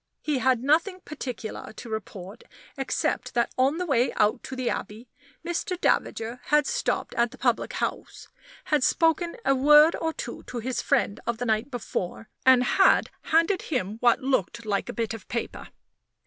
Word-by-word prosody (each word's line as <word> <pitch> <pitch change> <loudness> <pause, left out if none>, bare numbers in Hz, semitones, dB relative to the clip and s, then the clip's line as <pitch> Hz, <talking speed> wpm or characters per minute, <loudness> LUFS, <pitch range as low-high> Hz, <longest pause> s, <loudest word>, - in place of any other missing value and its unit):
He 295 -4 0
had 255 -2 +2
nothing 335 +7 +2
particular 250 -11 -7
to 235 - -10
report 205 -2 -7 0.3
except 270 -3 -2
that 235 - +1
on 270 +5 +2
the 360 - -2
way 260 -6 +2
out 210 0 +2
to 265 - -6
the 255 -1 -3
Abbey 220 +4 -4 0.4
Mr. 345 +2 -2
Davager 230 -6 0
had 300 0 +3
stopped - - -1
at 235 0 +2
the - - -14
public 240 -3 0
house, - - -4 0.4
had 300 -4 +1
spoken 330 +3 +2
a 275 - +4
word 295 +4 +6
or 325 - -2
two - - -7
to 245 - -6
his 245 +1 -2
friend 205 - +1
of 235 -1 -1
the 245 - -3
night 220 +3 0
before, 225 -4 -5 0.2
and 255 -1 +7
had 385 +9 +4
handed 335 +4 +2
him 220 - -3
what 240 -1 +3
looked 235 -4 -1
like 205 +2 -1
a - - -4
bit 230 -3 -2
of 225 - -9
paper. 235 +2 -4
255 Hz, 175 wpm, -26 LUFS, 225-300 Hz, 0.4 s, and